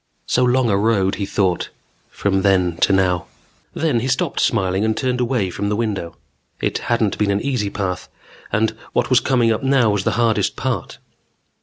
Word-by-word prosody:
So 125 Hz, -, +1 dB
long 125 Hz, 0 st, +3 dB
a 100 Hz, -, +2 dB
road, 100 Hz, -2 st, +2 dB
he 100 Hz, -, -1 dB
thought, 95 Hz, -3 st, 0 dB, 0.4 s
from 95 Hz, -1 st, 0 dB
then 95 Hz, -3 st, +2 dB
to -, -, +3 dB
now. 90 Hz, -2 st, +1 dB, 0.5 s
Then 155 Hz, -7 st, +1 dB
he 125 Hz, -, -2 dB
stopped 135 Hz, 0 st, -1 dB
smiling 95 Hz, -3 st, +1 dB
and 110 Hz, 0 st, 0 dB
turned 125 Hz, -1 st, -1 dB
away 120 Hz, -7 st, 0 dB
from 100 Hz, +3 st, -3 dB
the 105 Hz, -, 0 dB
window. 105 Hz, -6 st, -3 dB, 0.4 s
It -, -, -1 dB
hadn't 115 Hz, -4 st, +1 dB
been 105 Hz, -1 st, +1 dB
an 100 Hz, 0 st, +1 dB
easy 125 Hz, -7 st, -1 dB
path 95 Hz, -3 st, -4 dB, 0.4 s
and 110 Hz, +1 st, +1 dB, 0.2 s
what -, -, 0 dB
was -, -, +6 dB
coming 120 Hz, -3 st, +2 dB
up 110 Hz, -, -1 dB
now 135 Hz, -5 st, +3 dB
was 100 Hz, -1 st, -1 dB
the -, -, 0 dB
hardest 115 Hz, -2 st, +1 dB
part. -, -, -3 dB
105 Hz, 185 wpm, -20 LUFS, 95-120 Hz, 0.5 s, was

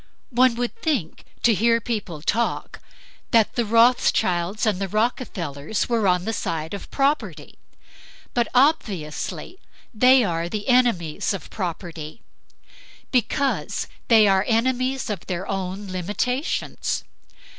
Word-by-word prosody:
One 250 Hz, 0 st, +4 dB
would 245 Hz, 0 st, -2 dB
think, 265 Hz, -, -2 dB, 0.2 s
to 235 Hz, -, +5 dB
hear 230 Hz, +3 st, +3 dB
people 205 Hz, -10 st, -4 dB
talk, 235 Hz, +7 st, -1 dB, 0.5 s
that 225 Hz, -3 st, +3 dB
the 240 Hz, -, +1 dB
Rothchilds 210 Hz, -5 st, +3 dB
and 205 Hz, -3 st, 0 dB
the 195 Hz, -, -1 dB
Rockefellers 200 Hz, -, -2 dB
were 230 Hz, -4 st, +2 dB
on 180 Hz, 0 st, +2 dB
the 225 Hz, -, -1 dB
side 160 Hz, -5 st, -3 dB
of 200 Hz, -, -7 dB
property. 280 Hz, +2 st, -1 dB, 0.7 s
But 240 Hz, -1 st, +1 dB
obviously 245 Hz, -, 0 dB, 0.3 s
they 255 Hz, +3 st, +6 dB
are 170 Hz, -3 st, -1 dB
the 210 Hz, +5 st, -4 dB
enemies 225 Hz, -8 st, +2 dB
of 195 Hz, -, -9 dB
property; 170 Hz, -2 st, -6 dB, 0.9 s
because 265 Hz, +2 st, 0 dB, 0.2 s
they 220 Hz, -3 st, +6 dB
are 195 Hz, -1 st, +4 dB
enemies 255 Hz, +3 st, +1 dB
of 195 Hz, -5 st, -6 dB
their 185 Hz, +1 st, -3 dB
own 195 Hz, +1 st, -3 dB
limitations. 210 Hz, -, -2 dB
215 Hz, 120 wpm, -23 LUFS, 180-245 Hz, 0.9 s, they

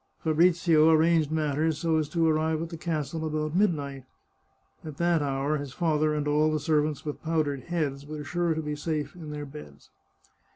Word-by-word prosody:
Fabrizio 165 Hz, 0 st, +4 dB
arranged 160 Hz, -1 st, +4 dB
matters 155 Hz, 0 st, 0 dB
so 165 Hz, 0 st, +1 dB
as 150 Hz, -2 st, -2 dB
to 165 Hz, -2 st, +1 dB
arrive 160 Hz, 0 st, +1 dB
at 165 Hz, 0 st, -4 dB
the 165 Hz, -, -7 dB
castle 160 Hz, -1 st, -3 dB
about 155 Hz, 0 st, -2 dB
midnight. 145 Hz, -9 st, 0 dB, 0.8 s
At 155 Hz, -3 st, -8 dB
that 170 Hz, -2 st, +2 dB
hour 140 Hz, +1 st, 0 dB
his 140 Hz, -2 st, -7 dB
father 155 Hz, -2 st, +1 dB
and 150 Hz, -1 st, -2 dB
all 150 Hz, +1 st, +3 dB
the 155 Hz, -, 0 dB
servants 150 Hz, 0 st, 0 dB
with 150 Hz, -, -5 dB
powdered 155 Hz, -4 st, -1 dB
heads 145 Hz, -5 st, -2 dB
were 150 Hz, 0 st, -6 dB
sure 170 Hz, +2 st, 0 dB
to 160 Hz, -, -3 dB
be 150 Hz, 0 st, -3 dB
safe 150 Hz, 0 st, -3 dB
in 165 Hz, -4 st, -9 dB
their 150 Hz, 0 st, -5 dB
beds. 135 Hz, -, -12 dB
155 Hz, 180 wpm, -27 LUFS, 150-160 Hz, 0.8 s, Fabrizio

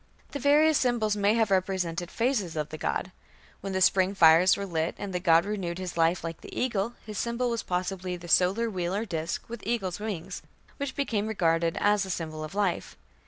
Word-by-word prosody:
The 285 Hz, -, -4 dB
various 300 Hz, +2 st, +4 dB
symbols 235 Hz, -4 st, +1 dB
may 205 Hz, +1 st, +2 dB
have 225 Hz, -3 st, +1 dB
represented 180 Hz, -2 st, 0 dB
phases 225 Hz, -9 st, -1 dB
of 150 Hz, -1 st, -2 dB
the 155 Hz, -, -7 dB
god. 185 Hz, -, -2 dB, 0.5 s
When 195 Hz, -, -5 dB
the 190 Hz, -, -1 dB
spring 190 Hz, +1 st, +3 dB
fires 165 Hz, +1 st, +6 dB
were 200 Hz, -, -3 dB
lit, 165 Hz, -3 st, -2 dB
and 200 Hz, -2 st, -6 dB
the 180 Hz, -, 0 dB
god 170 Hz, -1 st, +4 dB
"renewed 190 Hz, -5 st, -3 dB
his 185 Hz, -2 st, -5 dB
life 165 Hz, +2 st, +2 dB
like 165 Hz, -1 st, -6 dB
the -, -, -10 dB
eagle", 235 Hz, -2 st, -1 dB
his 215 Hz, -3 st, -5 dB
symbol 235 Hz, +1 st, -1 dB
was 230 Hz, -1 st, -1 dB
possibly 180 Hz, 0 st, -3 dB
the 175 Hz, 0 st, -11 dB
solar 190 Hz, +7 st, +3 dB
wheel 185 Hz, -3 st, -2 dB
or 215 Hz, +3 st, -1 dB
disk 165 Hz, -5 st, -4 dB
with 235 Hz, -2 st, -7 dB
eagle's 195 Hz, -5 st, -2 dB
wings, 195 Hz, -4 st, -5 dB, 0.4 s
which 280 Hz, -2 st, -4 dB
became 220 Hz, -7 st, -1 dB
regarded 165 Hz, -5 st, +1 dB
as 205 Hz, 0 st, +3 dB
a 190 Hz, -, -6 dB
symbol 155 Hz, -3 st, -4 dB
of 155 Hz, +5 st, -8 dB
life. 200 Hz, -4 st, -1 dB
190 Hz, 205 wpm, -27 LUFS, 175-220 Hz, 0.5 s, fires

